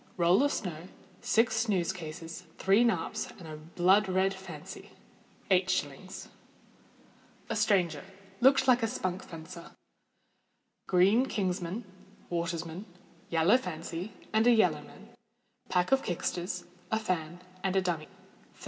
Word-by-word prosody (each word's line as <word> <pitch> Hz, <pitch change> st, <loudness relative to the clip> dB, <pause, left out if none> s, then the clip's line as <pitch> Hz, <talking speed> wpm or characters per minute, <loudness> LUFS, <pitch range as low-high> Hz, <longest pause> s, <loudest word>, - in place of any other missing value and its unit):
_ -, -, -27 dB
Roll 175 Hz, +4 st, +5 dB
of 285 Hz, 0 st, +3 dB
snow, 175 Hz, -, -4 dB, 0.3 s
six 230 Hz, -2 st, +3 dB
snooze 195 Hz, -6 st, +1 dB
cases, 165 Hz, 0 st, -8 dB
three 195 Hz, +5 st, +4 dB
narps, 215 Hz, -1 st, 0 dB
and 170 Hz, -, -10 dB
a 155 Hz, -, -7 dB
blood 180 Hz, +6 st, +2 dB
red 190 Hz, +1 st, +2 dB
fancy. 190 Hz, 0 st, -9 dB, 0.6 s
8_s._ 185 Hz, -2 st, 0 dB, 1.2 s
A -, -, 0 dB
Stranger—looked 195 Hz, -, +2 dB
like 250 Hz, -1 st, +5 dB
a 225 Hz, -, +2 dB
spunk 185 Hz, -4 st, -3 dB
fencer. 170 Hz, +1 st, -10 dB, 1.1 s
Green 200 Hz, +8 st, +4 dB
king's 190 Hz, -4 st, -1 dB
man, 190 Hz, +7 st, -4 dB, 0.5 s
water's 170 Hz, -1 st, -1 dB
man, 170 Hz, +5 st, -7 dB, 0.4 s
yellow 170 Hz, +8 st, +5 dB
fancy, 175 Hz, -1 st, -5 dB, 0.2 s
and 220 Hz, +2 st, +4 dB
yellow 180 Hz, -11 st, +4 dB
man; 210 Hz, +8 st, -15 dB, 0.6 s
pair 180 Hz, -1 st, +3 dB
of 270 Hz, 0 st, +5 dB
kicksters, 180 Hz, -1 st, -3 dB, 0.2 s
a 220 Hz, -, +1 dB
fan, 175 Hz, -5 st, -2 dB, 0.2 s
and 190 Hz, 0 st, 0 dB
a 190 Hz, -, +4 dB
dummie. 165 Hz, -4 st, -2 dB
185 Hz, 125 wpm, -30 LUFS, 170-210 Hz, 1.2 s, Roll